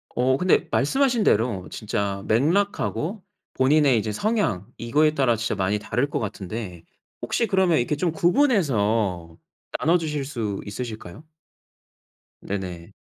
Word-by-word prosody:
어 130 +2 +2
근데 180 +2 +2
말씀하신 245 - +2
대로 110 - +1
진짜 100 -2 -3
맥락하고 185 - 0 0.3
본인의 140 -1 +4
이제 110 0 -1
성향 115 - -1
이거에 150 +6 +2
따라 130 -6 +2
진짜 110 0 -2
많이 100 +1 0
다를 125 +6 -1
것 - - -2
같은데 100 -4 -6 0.4
혹시 230 - 0
그러면 190 -4 +3
이렇게 125 +5 0
좀 165 +3 0
구분해서 115 - +1 0.4
나눠주실 155 -2 +1
수 110 -8 -3
있으실까요? 110 - -7 1.2
네네. 90 -4 -5
125 Hz, 285 characters per minute, -24 LUFS, 105-160 Hz, 1.2 s, 본인의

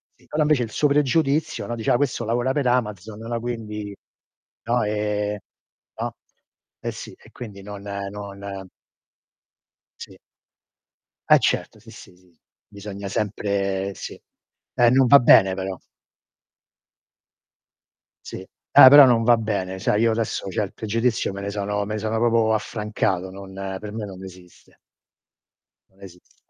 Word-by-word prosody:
Sì, - - -26
però 155 0 0
invece 150 -5 +2
il 115 - -5
suo 150 - +2
pregiudizio, 145 +1 +1
no, 120 - -3
diceva: 115 +1 +1
"Ah, - - +3
questo 125 -3 -1
lavora 120 +3 0
per 140 -3 0
Amazon." 105 -4 -2
no, 115 - -9
era 115 0 -2
quindi 105 -4 -6 0.7
no, 120 +1 0
ehm, 105 0 -2 0.6
no. - - -4 0.6
Eh, - - -4
sì. - - -9
E - - -20
quindi 105 -5 -10
non 100 -1 -9
non 100 -1 -7 1.3
Sì. - - -10 1.1
Eh, - - +7
certo. - - -1
Sì, - - -17
sì, - - -14
sì. 90 -3 -27 0.3
Bisogna 100 -1 -8
sempre 100 -1 -2
sì. - - -9 0.5
Eh, 120 -1 +5
non 130 +1 +4
va 140 +2 +8
bene 95 -6 +6
però. 95 -1 -5 2.5
Sì. - - -7
Eh, 95 +6 +5
però 145 0 +10
non 115 -2 +3
va 120 0 +5
bene. 100 -4 -3
Sai, 105 +2 +1
io 115 - +3
adesso 110 -3 -2
certe 100 +1 -2
pregiudizio 115 0 -1
me 100 - -6
ne 100 - -4
sono 105 0 -2
me 105 +1 -4
ne - - -3
sono 110 +1 -2
proprio 115 -1 +2
affrancato, 105 -4 -2
non 95 0 -11 0.3
per 105 -1 -7
me 110 -1 -5
non 95 -1 -10
esiste. 90 -1 -15 1.1
Non 95 +1 -28
esiste. 90 -1 -17
105 Hz, 145 wpm, -23 LUFS, 100-120 Hz, 2.5 s, però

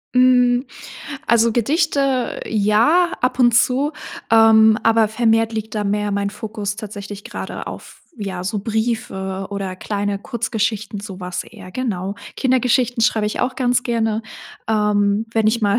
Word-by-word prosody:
Hm, 250 0 +4 0.6
also, 230 -1 +3
Gedichte, 275 - 0
ja, 225 - +3
ab 250 +1 0
und 240 -2 +5
zu, 270 +5 +2 0.4
ähm, 220 -1 +6
aber 225 -1 +4
vermehrt 225 0 +2
liegt 220 0 -5
da 210 -1 -1
mehr 210 +1 0
mein 200 0 -1
Fokus 210 -1 -5
tatsächlich 205 -2 -8
grade - - -6
auf, - - -9 0.2
ja, 195 -5 -5
so 205 +3 -2
Briefe 200 -3 -2
oder 195 -2 -4
kleine 205 0 -2
Kurzgeschichten, 220 -2 -2
so 195 -2 -9
was 180 -1 -4
eher, 200 -5 -12
genau. 200 -5 -3 0.2
Kindergeschichten 250 -2 +1
schreibe 220 -2 +2
ich 210 - -2
auch 250 +1 -1
ganz 250 -1 +1
gerne, 225 -2 -1 0.5
ähm, 210 0 +1
wenn 220 -2 +2
ich 230 +2 +2
mal 205 +1 +2
220 Hz, 145 wpm, -20 LUFS, 205-240 Hz, 0.6 s, ähm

